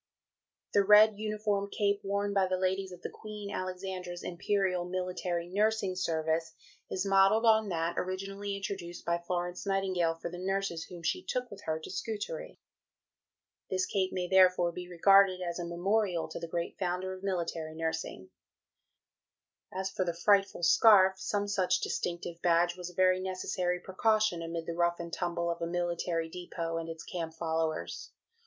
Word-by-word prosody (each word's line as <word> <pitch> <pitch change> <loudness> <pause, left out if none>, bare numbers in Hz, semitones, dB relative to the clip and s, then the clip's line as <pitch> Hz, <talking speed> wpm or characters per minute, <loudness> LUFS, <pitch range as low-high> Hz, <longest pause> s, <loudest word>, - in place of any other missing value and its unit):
"The 200 - +5
red 210 +1 +7
uniform 210 -2 -1
cape 200 0 0
worn 200 +1 -1
by 195 -1 +3
the 185 0 0
ladies 190 +1 -1
of 180 -1 -11
the - - -3
Queen 210 -2 -8
Alexandra's 185 -1 -5
Imperial 185 0 0
Military 180 -1 -3
Nursing 205 0 +1
Service 160 -2 -1 0.4
is 185 +1 -2
modelled 195 +3 +4
on 220 -2 +4
that 170 -1 -1
originally 195 +2 -4
introduced 190 -3 -6
by 170 0 +1
Florence 175 +1 -3
Nightingale 185 -4 +1
for 165 +1 -6
the 175 - -7
nurses 190 -3 -2
whom 175 -2 -10
she 365 - 0
took 250 -1 -3
with 200 0 -9
her 160 0 0
to 160 - -9
Scutari. - - -5 1.1
This 185 0 +1
cape 190 -1 0
may 180 -1 -2
therefore 185 -2 +5
be 180 +1 -8
regarded 190 +1 +5
as 175 -1 -3
a 175 - -3
memorial 180 +1 0
to - - -6
the 170 - -5
great 170 +1 -4
founder 185 +1 -2
of 185 - -9
military 170 -4 -3
nursing." 160 -13 -4 1.4
As 190 +1 -3
for 190 - -1
the 170 -2 -2
"frightful 195 0 +2
scarf" 190 +1 +6
some 205 0 -1
such 185 -3 +1
distinctive 170 -1 -3
badge 175 0 +3
was 180 -1 -6
a 180 - -15
very 185 0 +4
necessary 185 -1 -2
precaution 215 0 +1
amid 165 0 -4
the 170 - -3
rough 170 0 +1
and 170 -1 -6
tumble 170 -1 -1
of 170 - -5
a 170 - -1
military 170 -1 -1
depot 165 -1 -4
and 165 0 -4
its 165 0 -7
camp 165 -2 -5
followers. 160 -1 -2
185 Hz, 165 wpm, -31 LUFS, 170-195 Hz, 1.4 s, red